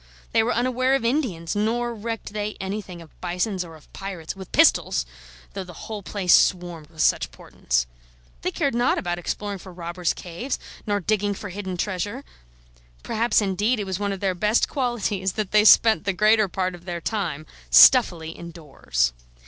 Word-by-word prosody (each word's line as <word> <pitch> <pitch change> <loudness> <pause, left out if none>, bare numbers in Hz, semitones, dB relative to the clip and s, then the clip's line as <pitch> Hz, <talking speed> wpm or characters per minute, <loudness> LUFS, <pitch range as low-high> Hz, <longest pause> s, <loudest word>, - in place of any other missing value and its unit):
They 225 - +4
were 230 +2 0
unaware 255 +2 +1
of 270 - -1
Indians, 225 - -1
nor 235 +3 0
recked 225 -1 -5
they 210 0 -3
anything 190 -3 -5
of 160 - -21
bisons 180 +2 -1
or 165 -2 -11
of 155 - -19
pirates 190 -5 -6
(with 190 -2 -10
pistols!), - - +3 0.5
though 195 - -4
the 180 -2 -11
whole 215 -2 -5
place 190 -2 +1
swarmed 175 -4 +2
with 160 -2 -6
such - - +2
portents. - - -2 0.6
They - - -1
cared 280 - -1
not 240 +1 +2
about 175 -1 -2
exploring 200 +3 -4
for 185 - -11
robbers' 175 0 -3
caves, 180 +10 -5 0.3
nor 205 -1 0
digging 205 +1 0
for 205 - -7
hidden 190 -1 -5
treasure. 205 +7 -3 0.8
Perhaps, 225 -1 +1
indeed, 205 +5 0
it - - -1
was 190 0 -3
one 205 -1 -1
of 195 - -5
their 195 -2 +1
best 210 +5 +2
qualities 210 -8 -1
that 215 -3 -3
they 210 0 +5
spent 220 0 +6
the 200 - +1
greater 215 +2 +4
part 185 0 -2
of 175 0 -12
their 175 -2 -4
time 170 -7 -3 0.2
stuffily 160 - +6
indoors. 150 - -3
195 Hz, 175 wpm, -24 LUFS, 175-215 Hz, 0.8 s, spent